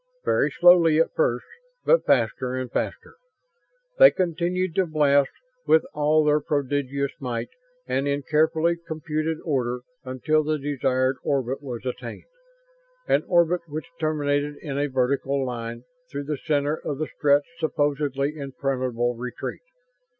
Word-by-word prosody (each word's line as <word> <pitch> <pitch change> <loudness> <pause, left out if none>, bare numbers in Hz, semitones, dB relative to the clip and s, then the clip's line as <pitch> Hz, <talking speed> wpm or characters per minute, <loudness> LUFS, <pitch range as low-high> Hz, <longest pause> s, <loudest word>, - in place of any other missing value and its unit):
Very - - +2
slowly 175 -3 +6
at 165 - +2
first, 125 -6 0 0.4
but - - +4
faster 125 +1 +1
and 130 -2 -4
faster. - - -4 0.8
They - - +10
continued 180 0 -1
to 185 0 +1
blast, 145 -3 +3 0.4
with 160 +1 +5
all 150 +1 +3
their 150 0 +4
prodigious 140 -1 -1
might 120 -3 -3 0.4
and 135 +2 -1
in 140 0 -1
carefully 160 +3 +2
computed 160 -1 -3
order, 125 -5 -1 0.2
until 135 +4 0
the 155 +1 0
desired 130 -2 0
orbit 135 -1 -1
was 125 -3 -7
attained 125 - -6 0.8
an - - +3
orbit 175 0 +3
which 155 +3 -6
terminated 145 -2 0
in 145 -4 -4
a 145 +1 0
vertical 135 +1 0
line 120 -1 -5 0.3
through 140 - -4
the 145 -1 -3
center 145 -1 +1
of 145 - -4
the 155 - -1
Stretts' 145 -1 +2
supposedly 145 -2 0
impregnable 130 -4 -2
retreat. 125 +2 -6
145 Hz, 135 wpm, -24 LUFS, 130-155 Hz, 0.8 s, They